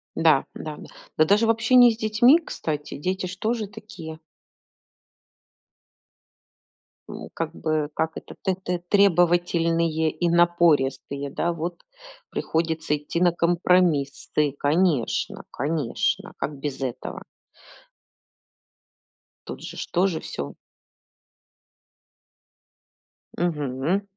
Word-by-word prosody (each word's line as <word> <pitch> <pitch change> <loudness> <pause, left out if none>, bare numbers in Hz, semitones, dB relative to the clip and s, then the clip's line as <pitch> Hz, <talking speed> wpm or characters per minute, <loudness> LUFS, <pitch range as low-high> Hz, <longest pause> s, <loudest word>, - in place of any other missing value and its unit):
Да, 160 -4 +4
да. 155 -1 -7 0.4
Да 155 - +5
даже 210 +6 +3
в - - +1
общении 235 +1 +6
с 220 - -6
детьми, 235 +8 +5
кстати, 150 - -5
дети 185 +5 -2
же 185 +1 -6
тоже 220 -1 -1
такие. 170 -6 -10 2.9
У, - - -8
как 165 -1 -3
бы, 155 -2 -1
как 160 0 0
это, - - -9
тэ 190 -2 +1
тэ 180 -1 -2
требовательные 170 -4 +3
и 170 +3 -1
напористые, 150 -5 +2
да, 170 +5 -1
вот 170 +1 -5 0.5
приходится 160 -2 -1
идти 150 +3 -4
на 175 -1 +4
компромиссы. 170 -5 +1
Конечно, 150 -4 +1
конечно. 145 -4 -1
Как 145 -1 -4
без 140 -2 -4
этого? 125 -3 -5 2.2
Тут - - -7
же - - -8
ж - - -5
тоже 180 -2 +1
всё. 70 0 -6 2.8
Мгм. 155 +2 -1
165 Hz, 100 wpm, -24 LUFS, 150-185 Hz, 2.9 s, общении